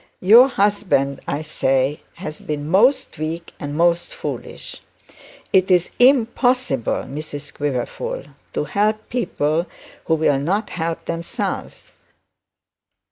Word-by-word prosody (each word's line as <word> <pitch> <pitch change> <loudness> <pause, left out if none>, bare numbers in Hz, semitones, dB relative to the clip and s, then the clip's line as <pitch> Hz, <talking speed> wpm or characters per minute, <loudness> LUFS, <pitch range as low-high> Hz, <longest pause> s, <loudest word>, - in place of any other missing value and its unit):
Your 230 +7 +8
husband, 200 - +1
I 145 +2 -2
say, 135 -2 0 0.2
has 155 -3 -7
been 150 -1 -4
most 245 - +3
weak 165 +2 -4
and 145 0 -5
most 170 0 +2
foolish. - - -6 0.7
It 190 0 +4
is 180 -2 +3
impossible, 245 - +3
Mrs 145 +1 -7
Quiverful, 145 - -3 0.3
to - - 0
help 215 +1 0
people 170 -8 0 0.4
who 160 - +2
will 150 -3 +2
not 195 +9 -1
help 165 -1 -3
themselves. 170 0 -4
170 Hz, 110 wpm, -21 LUFS, 145-215 Hz, 0.7 s, Your